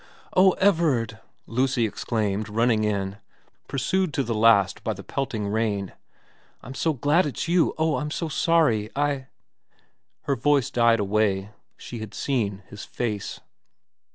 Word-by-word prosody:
' - - -28
Oh 185 0 +6
Everard! 150 - +1 0.2
' - - -44
Lucy 125 0 +1
exclaimed, 105 -1 -2
running 115 0 +2
in, 100 -2 -1 0.5
pursued 170 +5 -1
to 140 - +1
the 115 -1 -2
last 105 -3 +3
by 110 - -1
the 100 0 -10
pelting 115 -7 -3
rain, 105 -2 -1 0.4
' - - -34
I'm 130 - -8
so 160 +4 0
glad 150 +5 +2
it's 145 - -4
you 170 0 +2
oh 160 -1 +1
I'm 150 - -3
so 165 +2 -3
sorry 150 -9 +2
I 140 -2 -1 0.5
' - - -42
Her 140 - 0
voice 140 +1 +2
died 115 -1 +3
away; 100 -1 0 0.3
she 120 - -8
had 110 -2 -8
seen 105 -8 -1
his 105 - -9
face. 105 -5 -4
115 Hz, 155 wpm, -25 LUFS, 105-145 Hz, 0.5 s, Oh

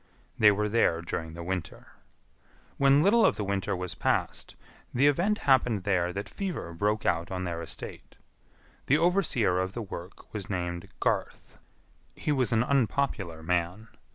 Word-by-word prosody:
They 105 - +8
were 105 +1 0
there 95 -6 +2
during 80 -1 -4
the 85 - -6
winter. 90 -2 -5 0.9
When 140 +2 +5
little 220 +5 +5
of - - +4
the 105 - -3
winter 100 0 -1
was 90 0 -4
past, - - -1 0.4
the 130 +3 +2
event 175 +9 +3
happened 125 -7 +3
there 90 -3 +1
that 100 +2 -5
fever 180 - -5
broke 105 +5 0
out 85 +1 +1
on 95 -1 -3
their 85 -2 -3
estate. 80 - -7 0.7
The 145 - +5
overseer 160 - +2
of 95 +1 -2
the 120 - -4
work 95 -2 -10
was 105 -3 -5
named 85 -3 -3
Garth. - - -2 0.6
He 150 - -2
was 130 -6 +2
an 115 0 +3
unpopular 120 - 0
man. 90 +5 -1
100 Hz, 155 wpm, -28 LUFS, 90-130 Hz, 0.9 s, They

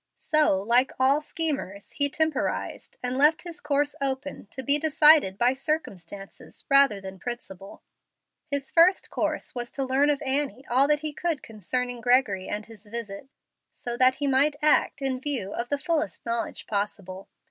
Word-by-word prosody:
So 305 - +2
like 240 +6 +2
all 270 +3 +4
schemers, 285 - -4
he 285 -1 0
temporized, 310 -1 -2
and 250 +1 -2
left 300 +3 +4
his 345 -2 -9
course 290 0 0
open 270 -3 -3
to 265 +5 -8
be 285 +4 +2
decided 300 -9 +5
by 245 +4 +3
circumstances 200 - -5
rather 275 -7 +5
than 190 -1 -9
principle. 195 -4 -8 0.7
His 280 -1 -3
first 345 +3 +4
course - - -2
was 240 -1 -5
to 275 - -2
learn 265 +3 +2
of 290 -2 +1
Annie 270 -2 -2
all 265 +3 +3
that 300 0 +2
he 305 -1 -4
could 330 -2 -2
concerning 240 +4 -4
Gregory 245 -6 +2
and 210 0 -4
his 220 -2 -16
visit, 225 +2 -7 0.4
so 240 -1 -5
that 255 +1 +4
he 285 - -3
might 280 +2 +3
act 300 -2 +2
in 260 -1 -1
view 260 -9 -3
of 235 +1 -4
the 285 - 0
fullest 315 +1 -2
knowledge 230 0 -2
possible. 200 -2 -4
265 Hz, 165 wpm, -26 LUFS, 225-290 Hz, 0.7 s, decided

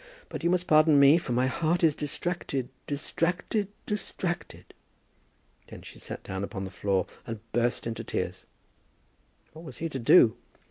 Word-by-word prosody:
But - - -6
you 170 - +3
must 180 0 +1
pardon 155 -2 +5
me, 140 +4 +7
for 135 - -6
my 125 +2 +2
heart 165 +6 0
is 160 -2 +5
distracted, 145 -3 -3 0.2
distracted, 175 +7 -1 0.2
distracted!" 190 -4 -4 0.9
Then - - -11
she - - -12
sat - - -7
down 95 +1 -4
upon 100 -1 -5
the 95 - -6
floor, 95 -1 0 0.2
and 115 -2 -5
burst 120 +1 0
into 115 -1 -4
tears. - - -4 1.1
What 160 +1 -11
was 130 -8 -9
he 165 - -3
to 135 - -4
do? 120 -1 +6
145 Hz, 155 wpm, -28 LUFS, 120-170 Hz, 1.1 s, me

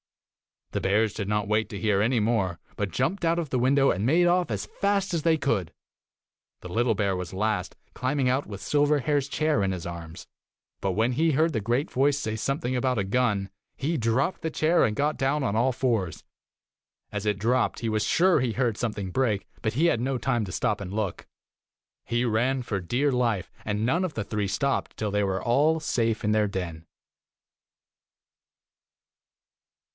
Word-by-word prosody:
The - - -2
bears 105 +2 +2
did 100 - -4
not 105 -1 -1
wait 110 +1 +1
to 100 - -6
hear 105 -3 +2
any 120 +3 +2
more, 105 -6 0 0.2
but 100 -2 -2
jumped 180 - -1
out 165 +1 +2
of 165 -4 -2
the 130 - 0
window 135 +2 +4
and 95 - -2
made 165 +7 +4
off 175 0 +2
as 105 -2 -2
fast 200 - -1
as 165 - 0
they 165 -1 +3
could. 115 - -1 0.9
The 90 - -8
little 115 +4 +1
bear 100 -1 0
was 90 0 -5
last, 105 +3 -1 0.2
climbing 130 +1 0
out 130 +3 0
with 100 -2 -8
Silverhair's 145 -1 +1
chair 155 -5 +1
in 95 -1 0
his 90 -3 -6
arms, 85 -1 -8 0.5
but 95 -1 -1
when 115 +5 +1
he 160 +6 +2
heard 160 +4 +3
the 115 - 0
great 120 +8 -1
voice 140 +2 +2
say 110 -6 -3
something 130 +1 -1
about 125 0 0
a 100 - +1
gun, 100 -2 0 0.3
he 160 +4 -1
dropped 125 +8 0
the 160 - -1
chair 160 +1 +3
and 105 -3 -1
got 150 +4 0
down 135 +2 +1
on 110 -5 0
all 125 +3 +2
fours. 115 -9 -1 0.9
As 105 0 -4
it 105 -2 +1
dropped, 120 +5 +1
he 115 - -1
was 110 -1 0
sure 180 -1 +4
he 125 -3 0
heard 120 -3 0
something 105 -5 -3
break, 110 -4 0 0.2
but 110 - -1
he 155 +8 +3
had 120 - +2
no 130 +2 -1
time 120 -2 0
to 90 - -7
stop 115 -4 0
and 95 -2 -6
12 - - -5
look. 90 - -9 0.8
He 120 +2 0
ran 125 +3 +1
for 105 -4 -2
dear 125 +11 0
life, 120 -7 0
and 105 +1 -1
none 170 +9 +2
of 170 - -4
the 110 - -3
three 105 -1 -2
stopped 135 +8 -1
till 105 -2 -2
they 105 0 +1
were 95 -1 -1
all 150 +7 +3
safe 115 -6 0
in 105 - +1
their 105 -1 +3
den." 85 -5 -5
120 Hz, 195 wpm, -26 LUFS, 105-140 Hz, 0.9 s, window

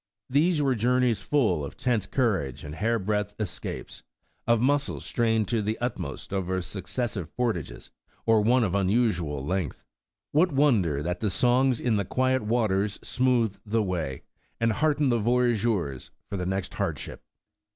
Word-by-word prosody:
These 150 +3 +3
were 135 -2 +3
journeys 120 -2 +2
full 95 - +1
of 70 - -7
tense 115 -6 0
courage 95 - 0
and 75 - -7
hair 115 +8 +1
breadth 105 0 -1
escapes, 105 -4 -5 0.5
of 115 -1 +4
muscles 145 +4 0
strained 115 -3 +1
tto 115 -3 0
the 110 +2 -1
utmost 105 - -4
over 95 -1 -1
successive 95 -1 -4
portages, 115 - -2 0.3
or 115 -1 +4
one 120 +3 +4
of 95 -5 0
unusual 95 - +1
length. 90 -3 -2 0.5
What 165 +4 +3
wonder 110 - +2
that 90 +2 -2
the 105 - 0
songs 125 +5 +2
in 115 -4 +1
the 100 - -1
quiet 130 +4 +1
waters 105 -3 0
smoothed 125 -5 +1
the 110 +1 0
way, 85 -9 -3 0.4
and 115 0 +2
heartened 150 +2 +2
the 120 - +2
voyageurs 110 - +1 0.2
for - - -2
the 90 -2 -2
next 95 -1 -2
hard - - -1
ship! - - -8
110 Hz, 155 wpm, -27 LUFS, 95-125 Hz, 0.5 s, of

